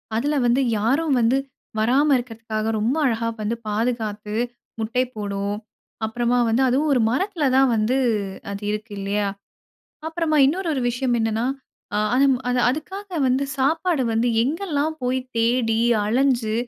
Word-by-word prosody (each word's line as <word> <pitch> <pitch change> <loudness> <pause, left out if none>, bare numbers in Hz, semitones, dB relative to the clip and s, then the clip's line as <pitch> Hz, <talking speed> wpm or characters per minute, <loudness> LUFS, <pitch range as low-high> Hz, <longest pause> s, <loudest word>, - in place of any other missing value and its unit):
அதுல 290 +6 0
வந்து 245 +3 +3 0.2
யாரும் 275 +9 +1
வந்து 240 +3 +3 0.4
வராம 260 +7 +3
இருக்கிறதுக்காக 225 -2 -3
ரொம்ப 235 +6 +1
அழகா 230 -2 0
வந்து 220 +3 -1
பாதுகாத்து, 215 -1 -2 0.4
முட்டைப் 250 +3 -1
போடும். 200 -1 -3 0.5
அப்பறமா 240 +2 0
வந்து 235 +4 +2
அதுவும் 280 +5 +2
ஒரு 250 - +3
மரத்தில 340 - 0
தான் 270 -1 +5
வந்து 220 +4 +1 0.5
அது 200 +1 -6
இருக்கு 210 +1 -5
இல்லையா? 200 +1 -1 0.8
அப்பறமா 320 -1 0
இன்னொரு 345 +5 -1
ஒரு 265 - -1
விஷயம் 250 0 0
என்னன்னா, 225 +1 0 0.5
அ - - +1 0.2
அதுவும் 270 0 +4
அது 250 0 +1
அதுக்காக 380 +9 -4 0.2
வந்து 260 +2 +2
சாப்பாடு 315 +2 +1
வந்து 230 +2 +1
எங்கெல்லாம் 310 +1 -1
போய் 255 +1 0 0.2
தேடி 230 -1 +2 0.2
அலைஞ்சு 240 -1 +1
245 Hz, 135 wpm, -22 LUFS, 220-275 Hz, 0.8 s, தான்